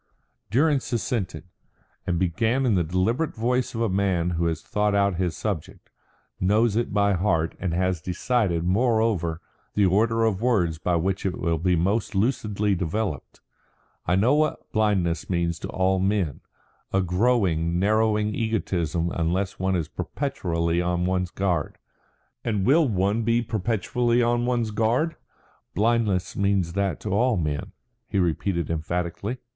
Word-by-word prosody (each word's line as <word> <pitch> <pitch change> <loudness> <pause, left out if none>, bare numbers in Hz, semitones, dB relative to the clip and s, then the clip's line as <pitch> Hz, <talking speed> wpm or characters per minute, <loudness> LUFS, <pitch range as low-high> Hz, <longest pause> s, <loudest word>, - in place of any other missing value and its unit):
Durrance 140 +4 +2
assented, 100 - -2 0.6
and 85 - +1
began 110 +9 +1
in 120 - +3
the 90 -3 +2
deliberate 95 - 0
voice 125 +2 0
of 115 - -2
a 115 - +2
man 95 -3 +1
who 85 0 0
has 80 -1 -2
thought 105 -1 0
out 100 -3 +2
his 90 -2 -1
subject, 100 -8 -5 0.5
knows 105 +3 +2
it 120 +1 0
by 100 -1 +2
heart, 85 -3 +1
and 90 - -2
has 90 -2 0
decided, 90 -1 0
moreover, 100 -4 +1 0.3
the 105 - +4
order 115 +4 +2
of 105 -3 0
words 90 -10 +1
by 90 +2 0
which 95 +3 -1
it 95 -2 -2
will 85 -2 0
be 90 +2 +2
most 100 +6 0
lucidly 105 -2 +1
developed. 90 -3 -3 0.7
"I 90 - +3
know 110 +8 +3
what 155 0 0
blindness 100 -6 0
means 85 -2 0
to - - -5
all 95 0 +1
men 95 -6 0 0.5
a 95 - +2
growing, 90 -4 +1
narrowing 105 +2 +2
egotism 90 -7 -1
unless 90 +4 -1
one 95 0 +1
is 85 -4 -1
perpetually 85 - -2
on 90 0 0
one's 90 -1 0
guard. 90 -5 -1 0.7
And 105 -5 -1
will 150 +4 +4
one 100 +1 +1
be 115 +1 +1
perpetually 115 +3 0
on 120 +1 +1
one's 120 -3 0
guard? 120 +10 +1 0.6
Blindness 105 -3 +1
means 100 -4 +1
that 100 -4 -1
to 105 - -4
all 120 +3 +2
men," 75 -4 -3 0.3
he - - -2
repeated 85 -1 0
emphatically. 85 +8 -3
95 Hz, 150 wpm, -25 LUFS, 85-115 Hz, 0.7 s, the